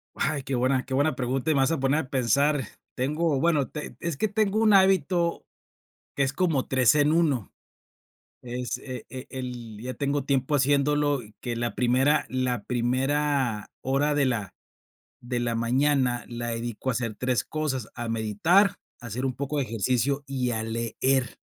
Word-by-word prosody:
Ay, 145 -2 -1
qué 135 - -3
buena 130 +1 +1
qué 130 - -9
buena 145 +1 +2
pregunta, 130 +4 -1
y - - +3
me 135 - +3
vas 135 - +3
a 160 - 0
poner 135 +3 +2
a 135 - -7
pensar, 140 +2 +2 0.3
tengo 150 +3 0
bueno, 155 -4 +2
teng 150 - -7
es 170 -4 -2
que 215 - +1
tengo 215 0 +1
un 215 -2 +5
hábito, 185 -3 +3 0.7
que 140 - -1
es 135 - 0
como 155 -3 0
3 130 -3 +4
en 150 +1 +4
1, 150 - +1 0.9
es 125 0 -4
e 130 -3 -8
e 130 0 -8
el 120 -5 -7
ya 130 +2 -4
tengo 140 -1 -1
tiempo 135 +1 +1
haciéndolo, 145 0 +2
y 105 0 -16
que 120 -1 -3
la 120 0 -2
primera 130 +5 +3
la 125 -4 -1
primera 130 -1 0
hora 140 +3 +1
de 145 - +3
la 115 -7 -2 0.7
de 120 0 -3
la 120 -1 -1
mañana 125 +1 +1
la 120 0 -5
dedico 115 +2 -3
a - - +3
hacer 115 -2 -2
3 125 +2 0
cosas, 145 -7 -2
a 120 -1 -4
meditar, 135 - +3 0.2
a - - -12
hacer 125 +4 -3
un 130 - 0
poco 140 +3 -3
de 140 - +1
ejercicio 125 +4 0
y 130 -3 -1
a 110 -1 -2
leer. 115 +3 -1
130 Hz, 180 wpm, -26 LUFS, 120-145 Hz, 0.9 s, un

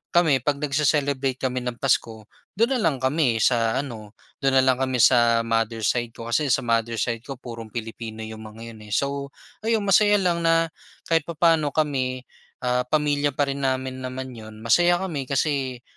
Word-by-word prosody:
kami 160 -6 +4
pag 145 +4 0
nagse-celebrate 140 -2 +1
kami 130 -1 0
ng 125 -1 -4
Pasko 115 -4 0 0.3
do'n 230 +6 +2
na 260 - +1
lang 150 - 0
kami 130 -3 +2
sa 115 -2 +2
ano, 110 -6 -9 0.2
do'n 135 -1 +1
na 130 - +5
lang 130 -1 +2
kami 130 -1 0
sa 120 -2 +5
mother 115 0 -1
side 120 +1 0
ko. 115 0 -7
Kasi 150 +4 +2
sa 125 - +2
mother 115 -1 0
side 115 +1 -1
ko 135 +4 -8
purong 115 -2 -9
Pilipino 110 0 -6
yung 110 0 -8
mga 115 +2 -10
'yon, 110 - -13
eh. 105 - -6
So 140 0 -1 0.3
ayon, 220 -1 0
masaya 205 +1 +4
lang 180 -4 +1
na 165 -1 +2 0.3
kahit 165 -2 0
papaano 160 -3 +2
kami, 130 -4 -1 0.4
ah, 125 0 0
pamilya 145 -1 +1
pa 140 -1 +1
rin 140 - -5
namin 130 -1 -2
naman 130 0 -6
'yon. 110 -2 -11
Masaya 175 +10 +4
kami 150 -8 -4
kasi 135 -3 -1
130 Hz, 185 wpm, -24 LUFS, 115-150 Hz, 0.4 s, na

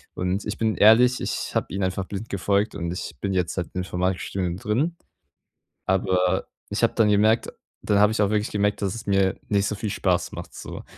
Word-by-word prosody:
Und 90 +3 -1
ich 105 - -4
bin 110 -1 0
ehrlich, 120 +4 +6
ich - - -3
habe - - +1
ihnen 100 - -1
einfach 95 0 -1
blind 105 +2 -6
gefolgt 100 +2 0
und 85 -3 -3
ich 90 -4 -6
bin 100 - -1
jetzt 90 -2 0
halt 90 -3 -2
im 90 - 0
Informatikstudium 90 0 -2
drin, 135 - -1 0.9
aber 95 -1 +1 0.2
ich - - -2
habe - - +3
dann 110 -2 +4
gemerkt 110 +3 +3 0.3
dann 100 -1 +2
habe 105 +1 +5
ich 110 - 0
auch 100 - +1
wirklich 105 0 0
gemerkt, 105 0 0
dass 100 +1 -1
es 115 - -8
mir 95 -1 +2
nicht 100 -1 +2
so 105 - -2
viel 105 +1 -4
Spaß 90 -4 0
macht - - -8
so. - - -8
100 Hz, 210 wpm, -24 LUFS, 90-105 Hz, 0.9 s, ehrlich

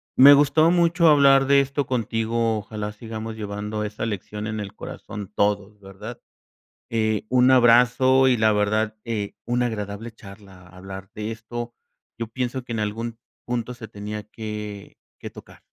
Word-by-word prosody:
Me 140 +2 +9
gustó 145 +3 +5
mucho 170 -1 +4
hablar 140 -2 +6
de 140 +1 +5
esto 140 0 -1
contigo. 115 -2 0
Ojalá 105 0 -6
sigamos 110 0 -7
llevando 105 0 -4
esa 105 +1 -4
lección 105 0 -5
en 110 -1 -3
el 100 - -7
corazón 100 -2 -8
todos, 105 0 0
¿verdad? 100 +5 -10 0.7
Eh, 110 -2 0
un 125 0 +4
abrazo 125 +2 +5
y 130 - +4
la 110 -1 +3
verdad, 110 +1 0
eh, 105 -4 -3
una 120 +1 +1
agradable 105 0 -5
charla 100 -4 -14
hablar 95 +1 -10
de 105 +1 -4
esto. 120 +1 -6 0.4
Yo 115 -1 -4
pienso 125 +2 -4
que 120 - -5
en 115 - -2
algún 115 +2 -4 0.3
punto 120 0 -3
se 115 -2 -10
tenía 105 0 -6
que 105 -1 -7 0.2
que - - -8
tocar. - - -15
110 Hz, 155 wpm, -23 LUFS, 105-125 Hz, 0.7 s, Me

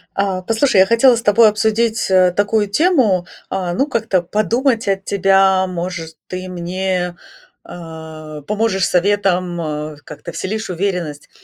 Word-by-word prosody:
А, 195 -2 -1
послушай, 225 +3 +1
я - - +6
хотела 230 +4 +5
с 235 - -3
тобой 215 +1 +5
обсудить, 220 +1 0
э, 185 -1 +4
такую 205 +3 +1
тему, 225 - +2 0.2
а, 180 -2 -2
ну, 270 +9 0
как-то 225 -8 0
подумать 230 +6 0
от 195 -1 -1
тебя, 195 -1 +3
может, 170 -2 -5
ты 185 0 -6
мне, 180 0 -3 0.5
а, 160 -2 -9
поможешь 210 0 0
советом, 185 -2 +1
а, 150 -1 -4
как-то 170 - -9
вселишь 215 +5 -4
уверенность. 175 -5 -3
190 Hz, 135 wpm, -18 LUFS, 175-215 Hz, 0.5 s, я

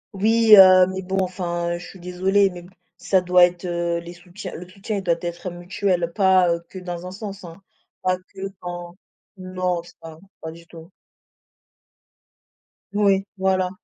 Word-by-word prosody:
Oui, 220 +2 +4
heu, 185 -2 +8
mais 190 - -4
bon 190 +1 -4
enfin, 175 -2 -3
je 180 - -10
suis 190 - -13
désolée, 190 +3 +1
mais 175 -1 -9
b 175 - -15 0.3
ça 190 - +2
doit 180 0 +4
être, 175 +1 -5
heu, 170 -1 -1
les 170 +1 -10
soutiens 180 +3 -10
le 180 +1 -9
soutien 200 +3 -5
il - - -3
doit 170 -2 +2
être 175 +1 -5
mutuel, 175 0 -2
pas, 185 -3 +4
heu, 170 - -5
que - - -10
dans 180 -1 -6
un - - -7
sens, 200 0 -8
hein, 175 +2 -12 0.4
pas 185 0 +1
que 190 +1 -15 0.2
dans 175 0 -7 0.4
non 185 -1 -3
je 170 - -16
pas 160 -1 -11 0.2
pas 160 - -6
du 170 +1 -15
tout. 165 +2 -14 2.0
Oui, 200 -1 +2
voilà. 190 -1 +1
180 Hz, 175 wpm, -22 LUFS, 175-190 Hz, 2.0 s, heu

